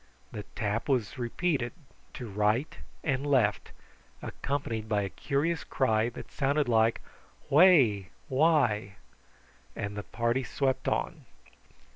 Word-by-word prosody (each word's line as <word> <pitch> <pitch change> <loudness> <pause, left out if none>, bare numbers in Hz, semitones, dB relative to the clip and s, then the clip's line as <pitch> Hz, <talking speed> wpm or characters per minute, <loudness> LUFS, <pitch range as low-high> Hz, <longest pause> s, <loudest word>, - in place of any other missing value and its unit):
The 105 - -5
tap 105 +5 -2
was 125 -2 0
repeated 125 +1 -1 0.4
to 125 - -6
right 105 +7 0 0.3
and 135 -4 0
left, 125 -8 +1 0.5
accompanied 115 -6 -3
by 105 -2 +1
a 100 - -3
curious 150 - -1
cry 110 -3 +1
that 120 - -10
sounded 140 0 +1
like 115 -1 +3 0.5
"Whai 135 - +5 0.2
why!" 130 -9 +2 0.8
and 100 0 -4
the 105 - -3
party 115 +4 -1
swept 130 +1 -1
on. - - -2
120 Hz, 115 wpm, -29 LUFS, 110-140 Hz, 0.8 s, Whai